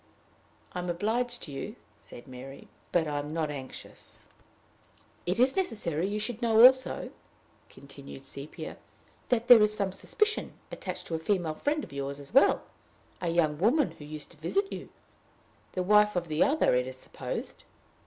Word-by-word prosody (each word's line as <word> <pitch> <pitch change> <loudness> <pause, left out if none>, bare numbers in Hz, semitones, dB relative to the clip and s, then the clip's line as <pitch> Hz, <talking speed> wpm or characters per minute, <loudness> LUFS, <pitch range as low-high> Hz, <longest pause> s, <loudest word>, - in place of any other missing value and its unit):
"I - - -3
am 180 0 -3
obliged 235 +7 -1
to 150 - -7
you," 135 - -5 0.2
said 120 - -13
Mary, 130 +2 -10 0.2
"but 170 -2 +3
I 145 -1 -1
am 145 +1 -5
not 155 -2 -1
anxious." 135 -2 -10 1.1
"It 180 +5 0
is 255 +2 +4
necessary 195 - -1
you 205 +1 -2
should 225 +2 -4
know 230 0 +7
also," 260 0 +4 0.6
continued 140 -1 -12
Sepia, 140 +2 -7 0.5
"that 240 -1 +1
there 240 -3 +10
is 210 0 +4
some 200 -2 -1
suspicion 425 - -1 0.2
attaching 185 -1 -5
to - - -6
a 160 - 0
female 170 -2 0
friend 295 - -1
of - - -10
yours 140 0 -4
as 140 +6 -8
well, 270 - +5 0.6
a 175 - -1
young 155 -3 +1
woman 250 - +3
who 150 - -12
used 150 0 -8
to 170 - -18
visit 390 - -1
you - - -7 0.8
the 185 - -1
wife 210 +2 +5
of 175 -2 -1
the 155 0 -1
other, 300 +3 +3
it 125 0 +2
is 130 0 -7
supposed. - - -6
180 Hz, 170 wpm, -29 LUFS, 150-230 Hz, 1.1 s, there